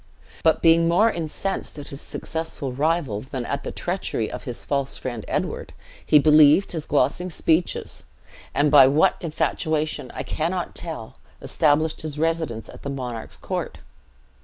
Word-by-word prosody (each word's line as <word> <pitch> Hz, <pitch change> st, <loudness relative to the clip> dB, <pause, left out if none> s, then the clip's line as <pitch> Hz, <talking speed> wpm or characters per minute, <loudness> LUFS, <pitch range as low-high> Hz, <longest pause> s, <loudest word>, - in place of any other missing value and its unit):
But 160 Hz, -1 st, +3 dB
being 165 Hz, 0 st, +5 dB
more 205 Hz, +7 st, +4 dB
incensed 170 Hz, +3 st, -4 dB
at 145 Hz, -, -8 dB
his 140 Hz, -, -9 dB
successful 160 Hz, -4 st, -5 dB
rival, 145 Hz, -6 st, 0 dB
than 130 Hz, -1 st, -5 dB
at -, -, -3 dB
the -, -, -4 dB
treachery -, -, -2 dB
of -, -, -7 dB
his -, -, -5 dB
false 140 Hz, -1 st, -2 dB
friend 120 Hz, -4 st, -5 dB
Edward, -, -, -3 dB, 0.3 s
he 150 Hz, -, +5 dB
believed 150 Hz, +4 st, +6 dB
his 160 Hz, -3 st, -5 dB
glossing 150 Hz, +6 st, +1 dB
speeches; 165 Hz, +1 st, 0 dB, 0.5 s
and 145 Hz, 0 st, +2 dB
by 140 Hz, -3 st, +9 dB
what 145 Hz, +4 st, +4 dB
infatuation 155 Hz, -3 st, -1 dB
I -, -, -3 dB
cannot 170 Hz, +3 st, -2 dB
tell 120 Hz, -10 st, -5 dB, 0.2 s
established 155 Hz, +1 st, +1 dB
his 155 Hz, -2 st, -5 dB
residence 160 Hz, -8 st, -1 dB
at -, -, -12 dB
the 140 Hz, -, -5 dB
monarch's 125 Hz, -4 st, -5 dB
court. -, -, -4 dB
155 Hz, 150 wpm, -23 LUFS, 140-165 Hz, 0.5 s, by